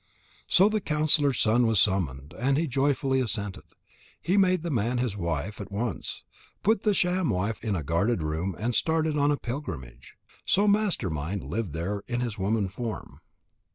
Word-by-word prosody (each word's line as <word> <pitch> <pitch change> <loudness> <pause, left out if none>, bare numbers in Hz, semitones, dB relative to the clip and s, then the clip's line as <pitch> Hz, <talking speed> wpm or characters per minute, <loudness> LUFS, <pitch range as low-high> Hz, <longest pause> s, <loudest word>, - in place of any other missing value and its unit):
So 190 +3 +5
the 215 0 0
counsellor's 150 -4 +3
son 115 +2 +3
was 110 -3 +3
summoned, 75 -9 0
and 135 +3 +2
he 165 - +1
joyfully 135 -1 +1
assented. 105 -5 -3 0.6
He 185 - 0
made 185 -4 +3
the 170 - -2
man 120 0 0
his 120 -4 -1
wife 95 +3 -3
at 100 0 -8
once, 105 0 -3 0.4
put 220 0 +3
the 210 -2 +2
sham 180 -2 +1
wife 105 +2 -1
in 105 -3 0
a 80 - -3
guarded 85 - 0
room 80 +5 -2
and 120 +3 -1
started 160 +4 +1
on 145 0 +3
a 145 - +2
pilgrimage. 65 - -7 0.3
So 205 +2 +3
Master 200 - +2
mind 80 +6 -3
lived 110 -8 -3
there 95 +5 -3
in 120 0 -2
his 120 -3 -2
woman 100 +1 +1
form. 110 +3 -6
120 Hz, 175 wpm, -27 LUFS, 95-150 Hz, 0.6 s, So